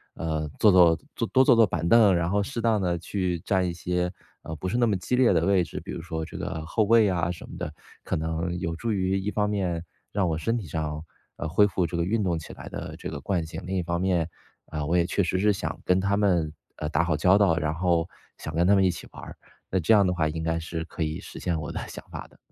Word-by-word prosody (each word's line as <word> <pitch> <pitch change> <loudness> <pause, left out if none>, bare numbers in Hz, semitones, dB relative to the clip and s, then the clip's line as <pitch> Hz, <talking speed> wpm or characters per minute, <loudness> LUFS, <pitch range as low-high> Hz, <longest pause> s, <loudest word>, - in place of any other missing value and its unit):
呃， 80 -1 -2
坐 105 - +6
坐 90 -3 +6 0.4
多 130 - +6
坐 130 - +6
坐 115 -1 +6
板 85 -3 -2
凳， 105 -2 +6
然 85 0 0
后 100 +2 +1
适 120 +2 -4
当 110 -3 +2
地 90 -2 0
去 90 0 -2
占 95 +2 0
一 85 - -2
些， 90 +1 -1 0.3
呃， 80 - -6
不 85 - -4
是 120 - -1
那 120 - +4
么 110 -3 +2
激 110 +7 -1
烈 125 -4 +4
的 85 -1 +2
位 95 -2 +3
置， - - -6
比 - - -8
如 - - -5
说 80 -1 -4
这 - - -9
个 80 - -4
后 110 +7 +1
卫 110 0 +5
啊 85 -2 0
什 85 - -9
么 - - -9
的。 75 - -5 0.3
可 - - -2
能 80 +2 -2
有 85 -2 -2
助 115 +7 -2
于 95 -1 +1
一 100 +2 -2
方 105 -1 0
面， 90 -5 -1 0.3
让 100 -3 +1
我 80 - -1
身 80 +9 0
体 105 -7 -6
上， 75 0 -3 0.3
呃， 85 - -3
恢 100 +5 +5
复 90 -2 0
这 85 - -4
个 85 - +1
运 105 +3 0
动 85 -3 0
起 80 - -8
来 - - -9
的 - - -6
这 - - -6
个 - - -5
惯 90 -5 -1
性， 80 - -7
另 95 +1 -3
一 - - +1
方 85 0 -2
面， 90 -3 +1 0.4
啊， 75 -2 -4
我 85 +4 0
也 85 - +3
确 100 - +1
实 90 +1 0
是 105 +2 +4
想 80 -5 -4
跟 90 0 +3
他 100 +1 +1
们， 90 -7 +1 0.2
呃， 75 - -4
打 80 +1 +2
好 85 -3 0
交 90 +5 +5
道， 95 -5 +4
然 75 -1 0
后 85 0 +1 0.3
想 80 - -7
跟 85 +2 +2
他 100 - +6
们 95 - +4
一 95 - +4
起 85 - -9
玩 - - -11
儿， - - -9 0.3
那 95 - +1
这 90 +6 +3
样 100 -2 +6
的 90 - +1
话 80 -3 +1
应 80 +1 -3
该 80 0 0
是 80 0 -4
可 85 - -8
以 80 +2 -3
实 - - -10
现 85 -3 -1
我 75 - -5
的 - - -4
想 - - -9
法 - - -7
的。 - - -24
90 Hz, 295 characters per minute, -26 LUFS, 80-100 Hz, 0.4 s, 坐